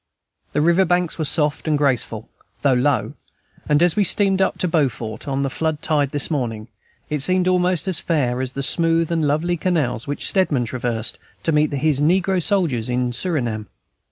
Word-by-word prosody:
The 150 - +1
river 170 +4 +4
banks 175 -1 0
were 155 - 0
soft 150 +1 0
and 155 -1 +2
graceful, 125 -6 0 0.4
though 140 -2 +4
low, 130 -1 +1 0.6
and 150 +2 +4
as 175 -2 +3
we 210 - +3
steamed 195 0 +2
up 190 - +1
to 180 - -1
Beaufort 130 -8 -2
on 140 0 -1
the 135 - -1
flood 160 +1 -2
tide 145 -3 +1
this 145 +3 -1
morning, 115 -6 -3 0.4
it 150 - 0
seemed 185 +6 +2
almost 180 -2 +1
as 185 -5 0
fair 130 -7 0
as 130 -1 -3
the 140 - -3
smooth 165 +2 +2
and 160 -3 +1
lovely 165 +4 0
canals 150 -10 -1
which 145 - -2
Stedman 150 -10 +2
traversed 115 -2 -3 0.2
to 165 - +1
meet 150 0 +2
his 145 0 0
negro 185 +4 +2
soldiers 160 - +1
in 125 0 0
Surinam. 120 - -2
150 Hz, 185 wpm, -21 LUFS, 130-175 Hz, 0.6 s, river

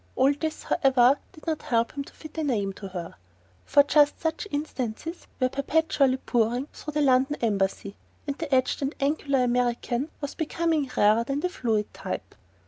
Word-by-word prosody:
All 270 +2 +4
this, 315 +2 -4
however, 265 0 +4
did 310 - -16
not 320 -2 -1
help 230 -1 +1
him 280 - -4
to - - -15
fit 310 -1 -12
a - - 0
name 205 -9 0
to 195 - -8
her, 180 -3 -6 0.5
for 285 0 +6
just 290 0 +4
such 320 +5 -2
instances 290 - -4
were 255 - +3
perpetually 275 -1 +1
pouring 240 +1 0
through 300 - -7
the 300 - +3
London 265 +2 +3
Embassy, 200 -2 -1 0.3
and 280 -2 -2
the 320 -3 -4
etched 255 +1 +2
and 275 +2 -2
angular 280 -2 +1
American 245 +2 0
was 285 -2 -4
becoming 320 -3 0
rarer 215 +3 +5
than 275 +4 -2
the 360 - 0
fluid 225 - -1
type. - - -6
275 Hz, 175 wpm, -26 LUFS, 240-300 Hz, 0.5 s, for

